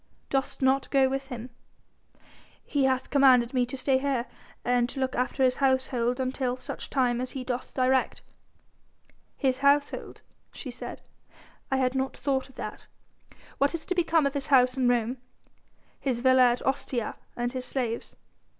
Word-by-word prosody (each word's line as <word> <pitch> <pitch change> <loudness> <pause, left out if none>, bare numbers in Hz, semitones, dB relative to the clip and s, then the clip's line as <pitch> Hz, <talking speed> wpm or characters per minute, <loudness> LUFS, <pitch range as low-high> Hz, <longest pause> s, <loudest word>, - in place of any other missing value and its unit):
"Dost 270 0 -1
not 265 +1 +2
go 270 -1 +4
with 270 0 -3
him?" 245 -1 -7 1.1
"He 285 -3 +1
hath 260 -1 0
commanded 260 -3 +5
me 250 -2 +2
to 270 - -6
stay 260 0 +2
here 265 -3 0 0.4
and 245 0 +2
to 270 - -7
look 260 -1 0
after 255 +2 0
his 255 -1 +3
household 260 -2 +1
until 255 -1 -1
such 255 - -6
time 245 -3 +1
as 255 - -4
he 265 - -4
doth 250 0 -4
direct." 260 0 +1 1.1
"His 260 -1 +1
household?" 285 +1 +1 0.3
she 260 - -7
said. 240 - -8 0.7
"I 265 - +1
had 255 -1 +1
not 265 0 -2
thought 265 -1 -1
of 260 - -19
that. - - -7 0.7
What 280 +4 +2
is 320 - -6
to - - -1
become 335 -3 +2
of 280 - 0
his 280 -2 -2
house 255 -2 +5
in 260 -2 +1
Rome, 245 +1 0 0.8
his 255 -4 -1
villa 260 -1 +6
at 240 - -4
Ostia 255 -3 -1 0.2
and 240 +1 -2
his 255 -1 -4
slaves?" 240 -4 -3
260 Hz, 165 wpm, -27 LUFS, 250-270 Hz, 1.1 s, villa